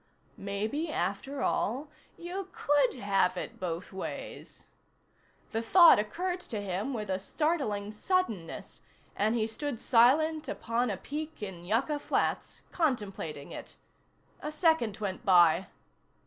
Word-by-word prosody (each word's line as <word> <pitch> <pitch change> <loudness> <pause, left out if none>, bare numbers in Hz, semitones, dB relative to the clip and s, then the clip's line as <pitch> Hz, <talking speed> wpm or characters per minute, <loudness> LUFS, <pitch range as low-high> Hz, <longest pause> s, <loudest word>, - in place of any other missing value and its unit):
Maybe, 215 +11 -2
after 205 - -2
all, 260 +8 0 0.3
you 370 +2 -5
could 285 -6 +2
have 195 -5 +1
it - - -6
both 175 0 -4
ways. 190 - -7 0.9
The 225 - -1
thought 340 - +8
occurred 355 - -2
to 230 -11 -5
him 200 +5 -2
with 215 -5 -3
a 190 - 0
startling 210 - -1
suddenness 215 - -2 0.3
and 215 +3 +1
he 220 -2 +1
stood 235 +3 -4
silent 300 +6 +4
upon 235 +1 -1
a 200 - -2
peak 300 - -6
in 180 -4 -7
Yucca 255 - +1
Flats, - - -1
contemplating 205 - -2
it. - - -9 0.6
A 300 - -4
second 305 - +2
went 200 -3 -4
by. 175 -1 +5
225 Hz, 125 wpm, -30 LUFS, 195-300 Hz, 0.9 s, thought